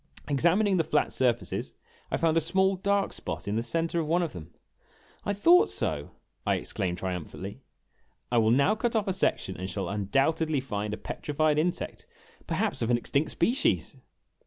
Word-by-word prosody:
Examining 180 +8 +3
the 165 - +3
flat 150 - +1
surfaces, 120 -2 0 0.4
I - - 0
found 165 -1 +2
a 165 - +4
small 190 +4 +2
dark 200 +1 0
spot - - -5
in 100 - -1
the 115 - +1
center 165 +6 -1
of 160 - -1
one 175 +3 +2
of 165 - -3
them. 85 -3 -9 0.8
"I - - +1
thought 340 - +5
so!" - - -2 0.3
I - - +2
exclaimed 90 -4 -2
triumphantly; 90 -3 -5 0.7
"I 120 - +4
will 110 -1 +3
now 140 - +4
cut 230 +1 -1
off 215 -2 +1
a 190 - +1
section 95 - 0
and 95 +1 -4
shall 100 -1 -3
undoubtedly 135 +10 +1
find 105 -5 -3
a - - -13
petrified 150 0 0
insect 175 +3 -2 0.4
perhaps - - -1
of 115 - 0
an 120 - +4
extinct 140 +5 0
species 235 +11 +1
155 Hz, 175 wpm, -28 LUFS, 110-180 Hz, 0.8 s, thought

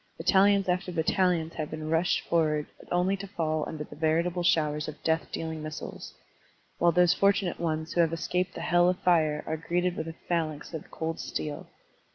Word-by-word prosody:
Battalions 200 0 +4
after 180 +1 0
battalions 170 0 +1
have 155 -2 -4
been 155 0 -5
rushed 165 +3 +2
forward 155 -3 +2 0.3
only 180 +2 +2
to 200 0 -7
fall 155 -5 -1
under 155 -2 -5
the - - -12
veritable 165 +3 +1
showers 150 -3 +1
of 155 -1 -8
death 160 0 0
dealing 160 -1 -4
missiles, 155 0 -7 0.6
while 175 - +5
those 175 0 +5
fortimate 200 -3 +2
ones 160 -1 -2
who 175 - +4
have 165 -1 +2
escaped 180 +2 -1
the - - -5
hell 175 0 +4
of 180 - 0
fire 155 -4 +2
are 160 - -2
greeted 175 +2 -1
with 160 - -4
a 165 - -6
phalanx 160 -3 -2
of 160 - -6
cold 160 0 -4
steel. 150 -1 -4
165 Hz, 185 wpm, -28 LUFS, 155-180 Hz, 0.6 s, while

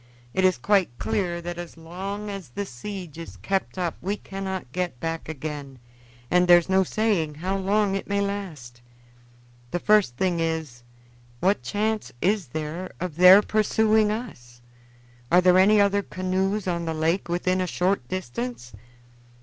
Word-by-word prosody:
"It 190 - +1
is 185 -1 +4
quite 190 - +1
clear 170 - -2
that 175 0 -5
as 175 -1 -8
long 195 +5 -6
as 195 -7 -7
the 200 +11 -4
siege 175 +3 -8
is 165 - -9
kept 195 -1 -2
up 175 -3 -2
we 200 +3 -2
cannot 190 -9 -6
get 175 -7 -3
back 165 +1 -4
again, 145 -3 -6 0.5
and 180 0 +4
there 175 0 +9
is 175 - -1
no 190 0 +3
saying 185 -7 0
how 185 +5 -2
long 195 +1 +1
it 195 - -3
may 200 0 0
last. 175 -12 -5 0.9
The 175 - -1
first 200 -10 +3
thing 180 -3 0
is, 160 -7 -2 0.6
what 190 -2 +2
chance 215 - -2
is 195 - +1
there 155 +7 -5
of 180 -4 -4
their 185 +3 +9
pursuing 215 0 +2
us? 120 - -7 0.7
Are 175 - +7
there 180 0 +5
any 210 +3 +5
other 200 0 +3
canoes 190 +2 -2
on 170 -1 -1
the 160 -1 -2
lake 165 +4 0
within 185 +2 0
a 185 - -1
short 180 -6 0
distance?" 120 -8 -5
180 Hz, 160 wpm, -25 LUFS, 160-200 Hz, 0.9 s, there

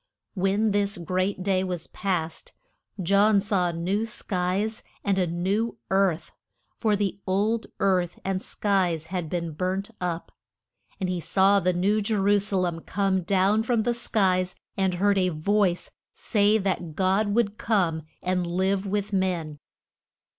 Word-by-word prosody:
When 200 +3 +1
this 200 -1 +1
great 185 +2 -1
day 190 -1 +1
was 180 -3 -3
past, 165 -5 -3 0.5
John 200 +3 +4
saw 195 -3 +1
new 175 +5 -1
skies 200 +1 -2 0.2
and 195 -2 +1
a 180 - +2
new 195 +7 -1
earth, 190 -3 +1 0.5
for 215 -3 +2
the 200 -1 -1
old 210 +4 +1
earth 180 -3 +1
and 190 -1 -1
skies 185 -8 0
had 175 -4 -2
been 170 -1 -2
burnt 185 +6 -2
up, 175 -2 -3 0.7
And 190 - -1
he 180 -1 -1
saw 195 +4 +3
the 185 -1 +2
New 200 +5 +2
Je 215 +2 0
ru 205 +1 +3
sa 195 -1 -1
lem 175 -2 0
come 195 +1 0
down 195 +4 +2
from 225 -1 +1
the 240 +1 +1
skies, 185 -6 +1 0.2
and 190 -2 +1
heard 200 +2 +2
a 185 -1 +2
voice 180 +3 0 0.2
say 210 -1 +2
that 185 -5 -2
God 195 +3 +1
would 215 -3 +1
come 180 -8 +1 0.2
and 180 -1 0
live 190 +3 0
with 205 +1 -2
men. 175 -6 -1
190 Hz, 150 wpm, -26 LUFS, 180-205 Hz, 0.7 s, John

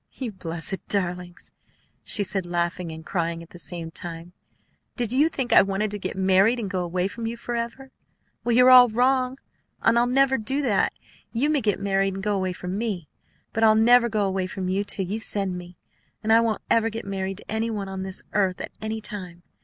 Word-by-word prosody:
"You 250 -4 -5
blessed 170 0 -6
darlings!" 180 -2 -2 0.5
she 205 - +5
said, 190 0 -2
laughing 175 0 -2
and 160 0 -9
crying 170 -1 -2
at 165 - -17
the 175 - -12
same 165 +2 -5
time. 170 +1 -7 0.6
"Did 240 -2 -2
you 295 +5 +4
think 265 -6 -2
I - - +9
wanted 195 +2 -1
to 205 - -3
get 190 - -4
married 190 +5 +4
and 205 -4 -4
go 185 -2 -1
away 180 +1 -1
from 225 +3 -5
you 235 +1 -4
forever? 240 +3 -5 0.5
Well, 235 -1 +1
you're 250 +1 +7
all 250 -1 +9
wrong. 255 +3 +1 0.4
I'll 235 +1 +3
never 265 +1 +3
do 265 +7 -1
that. 215 -7 +2 0.4
You 275 +6 +1
may 295 -3 +2
get 210 -3 0
married 195 -1 0
and 195 - -6
go 210 0 +1
away 185 -1 -1
from 180 +2 -5
me; 200 -9 -3 0.4
but 225 - 0
I'll 215 -1 +6
never 235 +2 +5
go 215 -2 0
away 190 -1 -1
from 185 -1 -4
you 195 +2 0
till 200 -1 -2
you 205 +5 -3
send 200 -4 0
me, 175 0 -9 0.5
and 220 +1 +3
I 225 - +6
won't 225 -3 -1
ever 225 0 +3
get 225 +1 -6
married 195 -1 -3
to - - -9
any 220 +1 -1
one 205 -3 -3
on 190 0 -5
this 190 0 -4
earth 190 -3 +1
at - - -5
any 220 0 -3
time! 180 -5 -5
200 Hz, 210 wpm, -25 LUFS, 185-230 Hz, 0.6 s, I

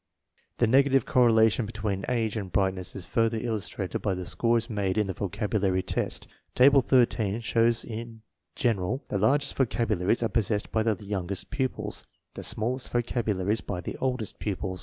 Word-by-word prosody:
The 120 - +3
negative 135 +3 +4
correlation 115 -2 +4
between 105 -3 -3
age 115 -4 0
and 100 -4 -4
bright 95 -2 +2
ness 95 -1 -7
is 95 -3 -5
further 115 0 +1
illustrated 110 -4 -3
by 100 -3 -1
the 90 0 -5
scores 115 +4 +1
made 100 -3 -1
in 105 - +2
the 95 - -3
vocabulary 100 0 -1
test. - - -2 0.3
Table 135 +2 +6
13 115 -5 +2
shows 115 +1 +2
that - - -12
in 115 0 -7 0.3
general 115 +2 0
the 100 - -1
largest 140 +8 +3
vocabularies 115 -4 +1
are 115 - +1
possessed 105 -1 -1
by 110 - +1
the 110 -2 -1
youngest 95 -1 -3
pupils, 130 -2 -3 0.3
the - - -7
smallest 125 +4 -1
vocabularies 110 -4 0
by 90 - -4
the 90 - -5
oldest 125 -5 -2
pupils. 95 -2 -3
110 Hz, 165 wpm, -27 LUFS, 100-120 Hz, 0.3 s, Table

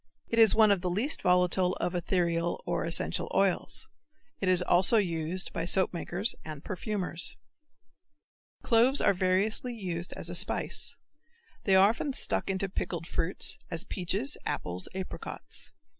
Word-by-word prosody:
It 230 - 0
is 225 -2 +5
one 220 -2 +5
of 195 -3 +1
the 180 - -2
least 220 - -1
volatile 180 0 +2
of 175 - -3
ethereal 170 -1 -1
or - - -2
essential 165 0 0
oils. 195 -2 +1 0.5
It 190 - -1
is 180 -1 +4
also 185 +6 +3
used 175 -2 -1
by 165 - -3
soapmakers 185 +2 0
and 155 -2 -9
perfumers. 185 -2 -1 1.3
Cloves 250 +4 +3
are - - +3
variously 195 +6 -1
used 180 -5 -5
as - - -3
a 175 - -5
spice. 180 +2 +2 0.7
They 195 - +3
are 190 +2 +6
often 265 +5 -3
stuck - - +4
into 195 0 0
pickled 170 -3 -5
fruits, 170 +1 +2
as 165 -2 -2
peaches, 200 +10 -1
apples, 90 +1 -3
apricots. 190 -1 -7
185 Hz, 145 wpm, -28 LUFS, 175-200 Hz, 1.3 s, are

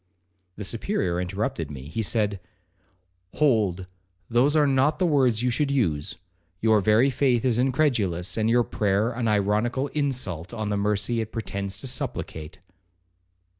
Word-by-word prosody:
The 105 - -6
Superior 95 - -1
interrupted 90 -4 -3
me. 70 -3 -8
He 85 +11 -4
said, 105 -2 0 1.0
'Hold, 105 - +1 0.5
those 130 +6 +3
are 150 -1 +4
not 140 +2 +2
the 185 - +1
words 130 -8 +2
you 125 - +2
should 145 +4 0
use. 90 - 0 0.4
Your 110 0 +4
very 110 +7 +4
faith 125 -2 +1
is 120 -2 +2
incredulous, 115 - +1
and 110 0 +1
your 120 +1 +4
prayer 105 +2 0
an 120 -1 -2
ironical 110 +6 +1
insult 120 - -2
on 110 -2 -3
the 105 - 0
mercy 105 +3 0
it 110 0 -6
pretends 100 -3 -3
to - - -3
supplicate.' 80 - -4
110 Hz, 145 wpm, -25 LUFS, 100-130 Hz, 1.0 s, are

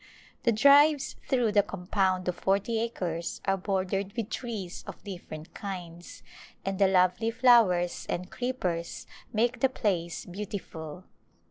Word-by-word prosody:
The 235 - +5
drives 280 +5 +5
through 245 -5 +2
the 205 0 +5
compound 185 -1 -1
of 180 - +1
forty 200 +5 0
acres 175 -7 -3
are 195 - +2
bordered 195 0 -2
with 230 -1 -3
trees 215 -8 -5
of - - -9
different 175 -5 -8
kinds 175 -3 -7 0.4
and 195 0 -2
the 195 - +6
lovely 185 +4 +3
flowers 225 -8 +4
and 180 +1 -3
creepers 185 -10 -3 0.3
make 235 +3 +1
the 265 - +4
place 180 -9 -2
beautiful. 180 -4 -7
195 Hz, 130 wpm, -28 LUFS, 180-230 Hz, 0.4 s, the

